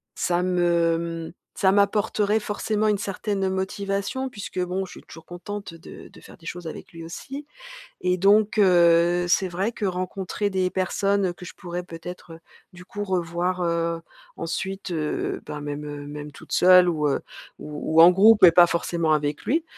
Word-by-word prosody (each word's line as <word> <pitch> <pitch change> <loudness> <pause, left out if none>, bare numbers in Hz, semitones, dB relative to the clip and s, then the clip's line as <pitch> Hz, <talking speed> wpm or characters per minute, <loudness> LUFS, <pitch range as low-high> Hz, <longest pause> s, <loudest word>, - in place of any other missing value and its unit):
ça 175 0 0
me, 170 -2 0
mmh, - - -15 0.2
ça 190 - +3
m'apporterait 205 +1 +2
forcément 210 0 -1
une 210 -1 +2
certaine 195 0 -2
motivation 200 +6 -3
puisque, 210 -4 -7
bon, 185 +2 -2
je 185 - -13
suis - - -12
toujours 165 - -14
contente 200 +2 -7
de 165 0 -12
de - - -17
faire - - -15
des 165 - -19
choses 175 0 -6
avec 160 - -9
lui 165 -1 -10
aussi 270 - -8 0.6
et 180 0 +1
donc 205 +3 +3
heu, 175 -2 +4
c'est 190 +1 +3
vrai 185 +5 -2
que 215 - -4
rencontrer 185 +2 -2
des 185 -2 0
personnes 195 0 0
que 180 - -12
je - - -9
pourrais 175 -1 -6
peut-être, 175 0 -9
heu, 165 - -12 0.3
du 180 0 -13
coup, 205 +2 -5
revoir, 180 -1 -1
heu, 170 -1 -1 0.3
ensuite, 190 +3 -4
heu, 155 -3 -2
ben, 150 - -6
même 145 0 -5
heu, 145 -1 -7
même 150 0 -8
toute - - -15
seule 180 0 +6
ou 155 -3 0
heu, 140 - 0 0.4
ou 150 +1 -5
ou - - +10
en 170 - +10
groupe 205 +3 +5
et 175 - +10
pas 175 +1 +7
forcément 170 -2 0
avec 150 -1 -1
lui. 315 +6 +1
180 Hz, 180 wpm, -24 LUFS, 170-195 Hz, 0.6 s, ou